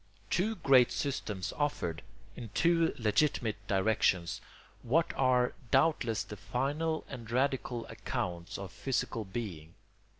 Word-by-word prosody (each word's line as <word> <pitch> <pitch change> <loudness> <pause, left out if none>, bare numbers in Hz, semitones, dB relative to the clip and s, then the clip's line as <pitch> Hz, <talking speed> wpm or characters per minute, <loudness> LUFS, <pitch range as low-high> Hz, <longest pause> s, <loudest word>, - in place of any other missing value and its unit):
Two 215 +5 +1
great 130 - +5
systems 105 -9 -2
offered, 85 - -1 0.3
in 115 -3 -7
two 165 -1 +4
legitimate 115 -1 +1
directions, 95 -3 +1 0.4
what 155 +8 +2
are 125 -2 +3 0.2
doubtless 135 -5 +2
the 105 - -9
final 140 +10 -1
and 120 -4 -8
radical 125 -1 0
accounts 105 -6 -4
of 100 -1 -7
physical 125 -4 -2
being. 95 -6 -6
120 Hz, 110 wpm, -32 LUFS, 105-140 Hz, 0.4 s, great